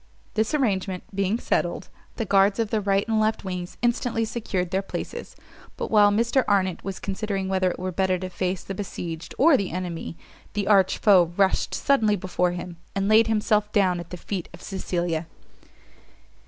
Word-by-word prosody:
This 220 +6 0
arrangement 195 -9 0
being 200 +2 0
settled, - - -1 0.3
the 225 - -2
guards 195 +1 +4
of 225 -3 -1
the 220 - +1
right 195 0 +1
and 220 -1 +1
left 215 -1 0
wings 180 -1 -5
instantly 235 -1 +1
secured 190 -6 -3
their 190 0 +1
places; 195 - -6 0.4
but - - -4
while 210 -2 +6
Mr 235 +5 +2
Arnott 190 -4 +1
was 195 -1 -5
considering 195 -1 -3
whether 190 -1 +1
it - - -5
were 185 +1 -3
better 185 +1 +1
to 185 +1 -5
face 185 +1 -2
the 195 - -5
besieged 175 -4 -6
or 305 +2 +6
the 200 -7 0
enemy, 170 -2 -5 0.4
the 205 -1 -1
arch 195 -3 +4
foe 180 -5 +5
rushed 195 -1 +2
suddenly 225 -7 +2
before 180 -1 -1
him, 175 -1 -7 0.2
and 195 0 0
laid 220 +1 +6
himself 210 -1 +1
down 185 -4 +2
at 170 - -8
the 180 - -6
feet 180 0 -5
of 175 - -15
Cecilia! 175 -4 -2
195 Hz, 180 wpm, -25 LUFS, 180-215 Hz, 0.4 s, while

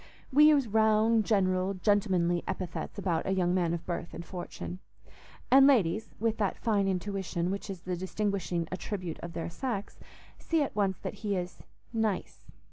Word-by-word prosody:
We 300 +3 +8
use 290 -5 +5
round, 220 +1 +3
general, 190 -2 +1
gentlemanly 185 -3 +2
epithets 185 0 -4
about 175 -5 -1
a 190 - +1
young 180 -1 +2
man 175 -3 +1
of 170 -1 -3
birth 170 -1 -4
and 170 - -7
fortune; 180 0 -6 0.7
and 270 +1 +8
ladies, 220 -5 +3
with 225 0 0
that 205 -3 0
fine 205 -4 +1
intuition 190 -2 -2
which 200 +1 -4
is 190 -3 -6
the 180 0 -3
distinguishing 185 -2 -2
attribute 185 -2 -4
of 170 0 -7
their 165 0 -4
sex, 220 -2 -4 0.4
see 325 -2 +1
at 280 - -5
once 195 -3 +1
that - - -4
he 205 -2 0
is 180 -1 -4 0.3
"nice." 220 -4 -2
195 Hz, 165 wpm, -30 LUFS, 180-215 Hz, 0.7 s, We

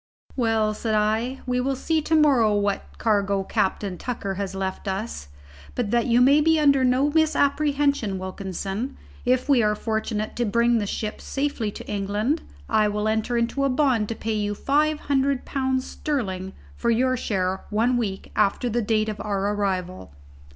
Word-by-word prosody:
"Well," 225 -3 +1
said 220 0 -2
I, 220 +5 0
"we 250 0 0
will 270 +2 0
see 315 +4 0
to 320 +2 +1
morrow 260 -9 +4
what 200 -1 -2
cargo 200 -3 +1
Captain 190 -1 -1
Tucker 225 -6 -3
has 195 0 -4
left 190 +1 -4
us. 195 - -4 0.5
But 225 -4 -1
that 235 0 +2
you 240 0 +4
may 280 +4 +6
be 320 +1 +3
under 280 -3 +4
no 255 +3 +3
misapprehension, 285 -7 +2
Wilkinson, 195 +6 -4 0.3
if 255 +2 +2
we 275 -4 +4
are 210 -1 +2
fortunate 220 0 -2
enough - - -8
to 240 - +1
bring 235 +2 +2
the 205 - -2
ship 215 +1 -4
safely 275 -6 -2
to - - -9
England, 210 +9 -1 0.3
I 215 -1 +3
will 210 +1 -1
enter 220 +2 0
into 235 +4 0
a 275 - +2
bond 255 -6 +2
to 230 - -3
pay 220 +1 -3
you 205 -1 -1
five 300 +5 +1
hundred 275 -1 0
pounds 260 -1 -1
sterling 195 -10 -3 0.2
for 235 - -1
your 255 +3 +2
share 190 -5 -2
one 230 +4 +2
week 205 -5 -3
after 215 +4 +1
the 240 +2 +1
date 215 0 +1
of 215 -1 -4
our 200 0 -1
arrival." 185 - -3
225 Hz, 175 wpm, -24 LUFS, 205-260 Hz, 0.5 s, may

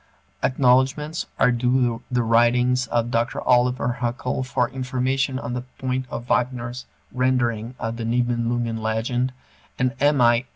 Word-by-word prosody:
Acknowledgments 130 +4 +2
are 125 - +4
due 125 -1 +1
the 125 -2 +1
writings 120 +2 +3
of 120 +1 0
Dr. 115 +1 0
Oliver 125 -1 +2
Huckel 120 +2 -2
for 125 -1 0
information 130 +1 -1
on 120 -2 -5
the 125 - -2 0.2
point 130 0 -2
of 120 - -5
Wagner's 125 0 -1 0.2
rendering 125 -2 0
of 115 +1 -4
the 115 - -4
Nibelungen 120 -1 0
legend, 120 +4 -1 0.5
and 125 0 +1
M. 145 0 +3
I. 120 +1 +4
125 Hz, 135 wpm, -23 LUFS, 120-130 Hz, 0.5 s, are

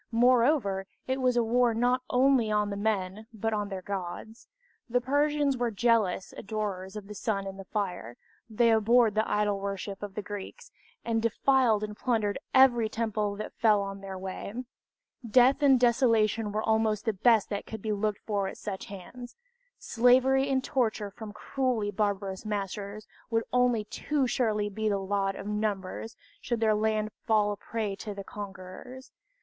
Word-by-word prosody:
Moreover, 235 -5 +3 0.2
it 260 +1 -1
was 250 -1 +2
a 240 - +4
war 235 0 +2
not 245 +2 +2
only 255 -3 +3
on 210 -1 +1
the - - -3
men 205 0 -2
but 225 0 -2
on 205 -1 -2
their 190 -2 -5
gods. 200 +4 -6 0.4
The 245 +1 +2
Persians 285 +1 +1
were 240 -1 0
zealous 225 -6 +1
adorers 200 -2 -4
of 210 -2 -6
the 210 - -7
sun 200 -2 -2
and 195 0 -7
the 195 - -8
fire, 180 - -4 0.3
they 230 +1 +3
abhorred 225 +1 +4
the 215 +1 0
idol 205 -1 +1
worship 195 0 -5
of 205 -1 -7
the 210 - -4
Greeks, 205 0 -8 0.3
and 225 -1 0
defiled 230 -1 +2
and 210 0 -5
plundered 215 -3 0
every 245 -4 +5
temple 215 -2 -1
that 215 - -6
fell 210 -3 +3
in 195 0 -10
their 195 -1 -6
way. 190 +2 -6 0.7
Death 255 +5 +4
and 270 -3 +5
desolation 230 -3 +2
were 215 +1 -2
almost 220 -1 +1
the 220 - +1
best 220 +1 +3
that 200 - -3
could 220 -2 -7
be 215 - -1
looked 210 0 -2
for 200 -3 -1
at - - -7
such 195 -3 -5
hands 240 +6 -10 0.4
slavery 260 +3 +3
and 265 -1 +1
torture 220 -6 -1
from 215 +1 -9
cruelly 225 -1 -1
barbarous 200 -2 -2
masters 205 0 -4 0.2
would 225 -1 +1
only 250 -3 +3
too 280 +6 -1
surely 215 -4 0
be 215 +1 -2
the 200 - +1
lot 195 0 -1
of - - -7
numbers, 210 0 -3 0.3
should 235 -2 -2
their 220 -1 +3
land 215 0 0 0.2
fall 210 -2 +3
a - - -3
prey 210 -1 -4
to 210 0 -6
the 200 - -6
conquerors. 200 +7 -9
215 Hz, 170 wpm, -28 LUFS, 200-240 Hz, 0.7 s, every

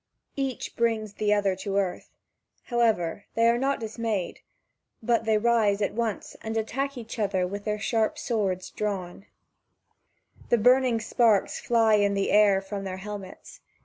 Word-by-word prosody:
Each 270 -2 -3
brings 225 -3 0
the 210 0 0
other 200 -2 +2
to 195 0 -3
earth; 190 -3 -2 0.5
however, 220 -7 0
they 230 +1 +4
are 235 +1 +3
not 275 +1 0
dismayed, 220 -4 -3 0.6
but 230 0 +1
they 220 -1 +3
rise 215 -3 +2
at 205 - -1
once 225 -2 -3
and 220 0 -3
attack 270 +5 -2
each 230 0 -7
other 195 -3 +1
with 200 +3 -6
their 210 -1 -1
sharp 220 +1 0
drawn 200 -7 -1
swords. - - -11 1.8
The 240 - +4
burning 250 +1 +4
sparks 220 -3 +2
fly 225 -2 +3
in 200 -1 +2
the 195 - 0
air 205 -2 +5
from 195 0 -5
their 185 -1 -5
helmets. 200 -1 -9
215 Hz, 150 wpm, -26 LUFS, 200-235 Hz, 1.8 s, air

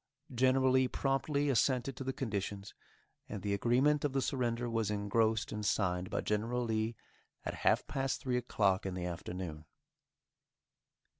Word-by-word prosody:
General 130 +1 +4
Lee 130 0 +4
promptly 140 +3 0
assented 130 +1 +1
to 135 - -5
the 130 - -1
conditions, 100 -5 -4 0.6
and 100 -3 -5
the 100 - 0
agreement 130 +8 +3
of 145 -2 0
the 135 - +1
surrender 120 -3 -1
was 115 -3 0
engrossed 110 +2 +1
and 105 0 -4
signed 90 -2 0
by - - -1
General 115 +4 0
Lee 110 0 -1 0.5
at - - -2
half - - +3
past 135 0 -1
three 130 -4 -1
o'clock 100 -6 +1
in 95 - -3
the 90 -1 -3
afternoon. 85 -2 -5
115 Hz, 150 wpm, -33 LUFS, 100-130 Hz, 0.6 s, General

